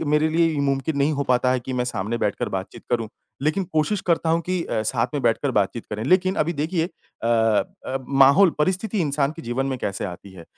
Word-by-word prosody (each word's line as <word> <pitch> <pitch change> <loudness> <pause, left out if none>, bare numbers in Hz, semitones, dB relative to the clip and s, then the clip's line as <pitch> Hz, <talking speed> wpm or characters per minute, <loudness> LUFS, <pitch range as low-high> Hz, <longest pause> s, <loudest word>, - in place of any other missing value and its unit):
क - - -2
मेरे 150 +1 +3
लिए 165 +1 +3
ये 145 - -1
मुमकिन 140 +2 0
नहीं 145 +2 +2
हो 140 - -1
पाता 125 0 +2
है 130 - 0
कि 130 - -6
मैं 125 -1 0
सामने 110 -1 -2
बैठकर 105 - -1
बातचीत 95 0 -5
करूँ, 115 -3 0 0.3
लेकिन 155 +7 +1
कोशिश 160 +6 +1
करता 165 -1 +2
हूँ 165 +1 +2
कि 180 0 -1
अ, 110 -2 -1
साथ 115 +2 0
में 145 - 0
बैठकर 120 +4 +1
बातचीत 105 +2 0
करें, 105 +1 -3
लेकिन 185 +6 +3
अभी 165 +3 +1
देखिए 160 +3 -1
अ 165 -8 -11 0.6
अ, 130 - -2
माहौल 140 +7 +6
परिस्थिति 190 +6 0
इंसान 145 -2 0
के 165 - -10
जीवन 120 +3 -2
में 135 -1 -2
कैसे 100 -3 -3
आती 95 +1 -7
है 90 -3 -12
140 Hz, 225 wpm, -23 LUFS, 120-165 Hz, 0.6 s, माहौल